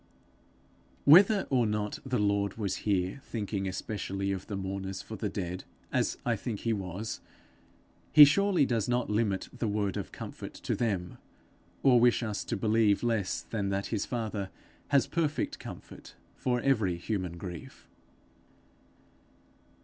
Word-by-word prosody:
Whether 195 +7 +7
or 125 -4 +3
not 105 0 -2
the 130 -2 -1
Lord 100 0 +1
was 100 -4 -1
here 95 +5 0
thinking 100 -4 -3
specially 100 0 -3
of 95 -1 -4
the 105 - -4
mourners 95 0 -4
for 110 - -7
the 105 +1 -2
dead, 90 -1 -4 0.3
as - - 0
I - - +2
think 110 -4 -5
he 115 - +1
was, 100 +2 -4 0.9
he 150 -1 +11
surely 180 +1 +3
does 115 -3 0
not 120 -2 0
limit 105 -3 0
the 120 -2 -2
word 100 -2 -1
of - - -5
comfort - - -8
to - - -2
them, 95 -7 -2 0.6
or 125 -3 +6
wish 120 0 +4
us 105 -3 -2
to - - -2
believe 110 0 +3
less 115 -6 0
than 100 -3 -2
that 100 0 -1
his 105 - -1
father 110 -5 -3 0.4
has 140 -2 +4
perfect 155 -3 -1
comfort - - -10 0.2
for 125 -1 0
every 110 -10 +2
human 90 -2 -3
grief. 90 -2 -9
105 Hz, 145 wpm, -30 LUFS, 95-120 Hz, 0.9 s, he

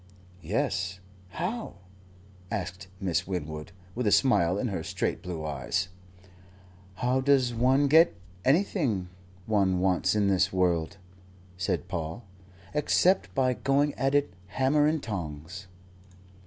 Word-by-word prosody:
"Yes, 95 - -1 0.3
how?" 190 - -4 0.7
asked 95 -2 -4
Miss 90 -4 -1
Winwood, 80 -4 -5 0.2
with 125 -2 -2
a - - +3
smile 95 -10 +4
in 120 +3 -1
her 95 -5 -3
straight 80 - -2
blue 85 -4 -5
eyes. 80 +6 -2 1.1
"How 125 +6 +1
does 130 -3 +3
one 130 +4 +3
get 160 +4 +6 0.3
anything 135 - +1 0.4
one 100 -4 +2
wants 95 +1 +2
in 105 -1 +2
this 95 -1 +2
world," 90 0 0 0.6
said 90 -1 -2
Paul, 80 +7 -4 0.5
"except 165 +5 +2
by 130 -1 +2
going 140 +5 +1
at 135 +2 0
it, 145 -10 +1
hammer 135 +8 +2
and 155 -1 0
tongs?" 90 -2 -6
100 Hz, 120 wpm, -28 LUFS, 90-135 Hz, 1.1 s, get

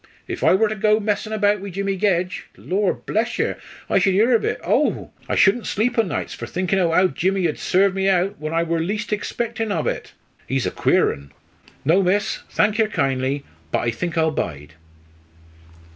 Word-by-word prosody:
If - - -5
I - - +5
wor 220 +3 +3
to 215 - -2
go 215 0 +2
messin' 210 0 -2
about 210 -1 +2
wi' 200 - -6
Jimmy 195 +1 -2
Gedge, 185 -2 0
Lor' 195 +1 0
bless 225 +2 -2
yer, - - -1 0.3
I - - +3
should 195 -2 +2
'ear 225 +5 +4
ov 230 - +3
it - - -1
oh! - - 0 0.2
I - - +1
shoulden 210 +4 +4
sleep 220 +5 0
o' - - +8
nights 195 -6 -3
for - - -7
thinkin' 185 +1 0
o' 175 -2 +2
how 180 +3 +4
Jimmy 190 0 0
ud 150 - -4
serve 190 +1 +2
me 195 0 +1
out 190 -1 +1
when 155 +1 -4
I 165 +1 +1
wor 170 0 -1
least 210 +6 -3
egspectin' 225 +1 -3
ov 165 -6 -1
it. - - -3 0.3
He's 135 -1 -1
a - - -1
queer - - +2
un. 70 0 -13 0.5
No, 170 +7 +4
miss, 195 +2 0
thank 210 +2 +1
yer 220 - +4
kindly; 135 -5 -1 0.3
but - - 0
I 120 - 0
think 170 +8 -4
I'll 160 -1 +3
bide." 75 - -4
190 Hz, 205 wpm, -21 LUFS, 165-210 Hz, 0.5 s, o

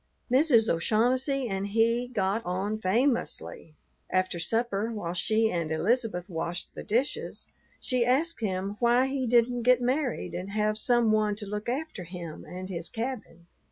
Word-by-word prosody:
Mrs. 255 -4 +5
O'Shaughnessy 250 - +1
and 195 -1 -2
he 230 +3 +2
got 210 -2 -1
on 195 +4 -2
famously. 220 - -1 0.3
After 185 -2 0
supper, 225 +3 0
while 175 -6 -4
she 220 +5 +1
and 165 -2 -2
Elizabeth 185 +2 0
washed 175 0 -4
the - - -7
dishes, 240 +6 -2 0.3
she 250 -2 0
asked 290 +8 +1
him 195 0 -2
why 240 +2 +4
he 265 -1 -2
didn't 240 +1 +3
get 250 +1 +5
married 255 +1 -1
and 185 +2 -5
have 215 0 0
some 240 -2 +3
one 215 -1 +2
to 210 0 -7
look 210 +2 -4
after 270 - -3
him 170 -2 -8
and 185 +1 -7
his 170 -3 -2
cabin. 225 -8 -5
220 Hz, 155 wpm, -28 LUFS, 185-245 Hz, 0.3 s, Mrs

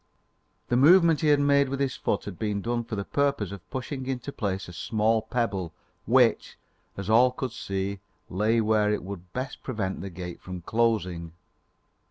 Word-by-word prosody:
The 120 - +2
movement 165 +3 +6
he 155 - +2
had 145 -1 +5
made 140 -1 +3
with 135 0 -3
his 135 -2 0
foot - - -1
had 100 -4 -7
been 105 -2 -1
done 120 0 -1
for 115 - -5
the 100 -1 -3
purpose 140 -9 0
of 100 -3 -10
pushing 130 0 -5
into 130 +1 -3
place 95 -6 -3
a 90 - -10
small 110 +5 +1
pebble, 100 -9 -2 0.3
which, - - +3 0.4
as 100 -1 -5
all 120 +4 +6
could 125 0 -4
see, 100 -2 -3 0.3
lay 110 +5 +1
where 105 -1 +2
it 105 - -1
would 90 -2 -8
best 130 +4 -5
prevent 105 -7 -3
the 95 - -5
gate 90 -1 -7
from 90 -1 -7
closing. 95 -7 0
110 Hz, 180 wpm, -27 LUFS, 95-130 Hz, 0.4 s, movement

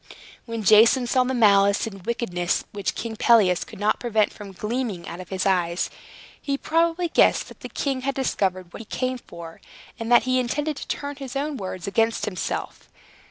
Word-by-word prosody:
When 230 -1 -4
Jason 225 +5 +6
saw 255 +1 +2
the 260 +1 -1
malice 200 -3 +4
and 195 -4 -8
wickedness 180 -6 -1
which 200 -2 -3
King 225 -1 -5
Pelias 210 -8 +4
could - - -12
not 210 +1 +1
prevent 220 -3 +1
from 205 -2 -10
gleaming 210 -2 -3
out 170 - -7
of 180 -2 -9
his 190 -1 -2
eyes, 175 -2 +1 0.5
he 280 -1 -1
probably 335 +3 +1
guessed - - +3
that - - -14
the - - -8
king 270 -2 -2
had 275 +1 -2
discovered 185 -9 -1
what - - -8
he - - -10
came 255 +3 -2
for, 170 -6 -11 0.4
and 230 +1 -4
that 240 - +7
he 255 0 +1
intended 295 +5 -1
to - - -7
turn 285 0 -4
his 270 -2 -7
own 290 +2 -2
words 185 -6 -6
against 225 +3 +1
himself. 185 -4 -4
225 Hz, 190 wpm, -24 LUFS, 195-255 Hz, 0.5 s, that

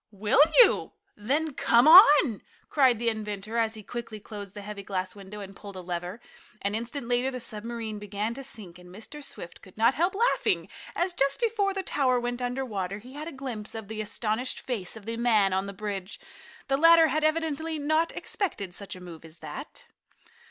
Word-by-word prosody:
"Will 210 +6 +2 0.2
you? - - +1 0.2
Then 285 +8 -1
come 240 +1 +4
on!" 300 - +8 0.3
cried 260 -5 +4
the 235 +1 +1
inventor 215 0 -4
as 225 -1 +1
he 215 - -10
quickly 230 0 -6
closed 205 -2 -9
the 205 - -7
heavy 205 0 -7
glass 185 -1 -4
window 205 +1 -9
and 195 -1 -9
pulled 200 -1 -10
a 185 - -6
lever. 180 +3 -5 0.4
An 200 +1 0
instant 235 +3 -4
later 245 +2 +1
the 255 -1 -5
submarine 225 -1 -5
began 205 +2 -3
to 275 +3 -7
sink, 195 -9 -7
and 180 0 -14
Mr. 225 +10 -9
Swift 175 -10 -8
could 190 - -17
not 230 +3 +4
help 345 +8 0
laughing 470 +4 +1 0.3
as, 355 +1 0
just 275 -4 +1
before 430 -4 +1
the 390 - -2
tower 255 -7 +1
went 245 +1 -3
under 250 +2 -2
water, 195 -4 -3
he 245 +5 -13
had 300 +2 -6
a - - -5
glimpse 245 -6 -6
of 220 -2 -7
the 220 0 -4
astonished 220 +3 -2
face 225 -5 -3
of 210 - -13
the 230 0 -4
man 215 -5 +3
on 190 +1 0
the - - -5
bridge. 200 -1 -5 0.5
The 270 -1 +2
latter 330 +1 +7
had 310 0 0
evidently 315 0 0
not 310 +3 +1
expected 205 - -3
such 200 +2 -8
a 185 - -11
move 170 -3 -10
as 160 0 -14
that. 265 - -9
225 Hz, 200 wpm, -27 LUFS, 200-275 Hz, 0.5 s, on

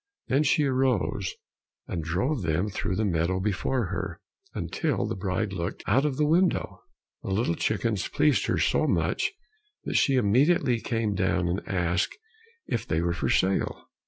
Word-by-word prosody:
Then 135 +3 +3
she 150 +1 +3
arose, 130 -8 0 0.5
and 85 - -3
drove 95 - -1
them 85 +4 0
through 95 -1 -2
the 110 +3 0
meadow 90 0 0
before 105 +5 0
her, 95 0 -4 0.4
until 145 - -1
the - - -3
bride 100 +2 -2
looked 85 -1 -4
out 130 +8 +3
of 140 -3 -1
the 150 - +2
window. 175 +5 +1 0.4
The - - -6
little - - +1
chickens - - -1
pleased - - +2
her - - +1
so - - +2
much 420 - +1 0.5
that - - 0
she 135 - +3
immediately 125 - +3
came 115 -2 -1
down 95 -2 +1
and 90 +3 -1
asked 90 -1 0 0.5
if 115 +1 -3
they 80 - +1
were 85 0 0
for 85 - -2
sale. 95 +1 0
105 Hz, 160 wpm, -27 LUFS, 90-130 Hz, 0.5 s, Then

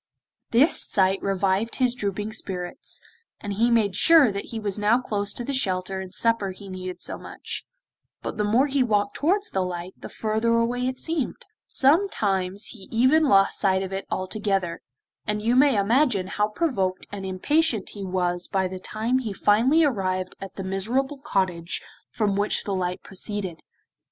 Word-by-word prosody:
This 260 +8 +3
sight 190 0 +1
revived 195 +3 0
his 250 -2 +2
drooping 205 -2 -3
spirits, 180 -4 -4 0.4
and 205 -1 -4
he 230 +4 +2
made 215 -5 +2
sure 305 - +6
that 200 0 -4
he 225 - -6
was 210 -1 -2
now 215 +4 +4
close 205 -4 -2
to 240 - -5
the 280 - -3
shelter 190 -6 -1
and 190 -1 -8
supper 230 0 +1
he 195 +1 -9
needed 185 -1 -6
so - - -4
much, - - -6 0.6
but - - -4
the 210 - +1
more 225 +6 +3
he 280 -1 +1
walked 205 -4 +1
towards 395 +7 +1
the 190 - 0
light 180 0 -5
the - - -10
further 220 +1 0
away 240 +2 +1
it 260 0 -3
seemed; 320 -3 -3 0.2
sometimes 205 - +1
he 200 -5 -11
even 260 +7 +4
lost 195 -7 +4
sight 190 -1 +2
of 190 0 -5
it 195 - -4
altogether, 190 -2 -2 0.5
and 210 0 -1
you 235 +2 +2
may 265 -2 +5
imagine 220 -1 +2
how 210 +2 0
provoked 210 - -1
and 200 -1 -6
impatient 220 - +1
he 205 - -7
was 180 -1 -1
by 190 -1 0
the 185 0 -7
time 225 +6 0
he 230 -5 -4
finally 235 +12 +4
arrived 185 -8 0
at 195 -1 -8
the 195 - -5
miserable 240 +9 -1
cottage 185 -8 -1 0.3
from 205 -3 0
which 205 +1 0
the 200 - -3
light 180 -1 -2
proceeded. 195 -3 -3
205 Hz, 175 wpm, -25 LUFS, 190-240 Hz, 0.6 s, sure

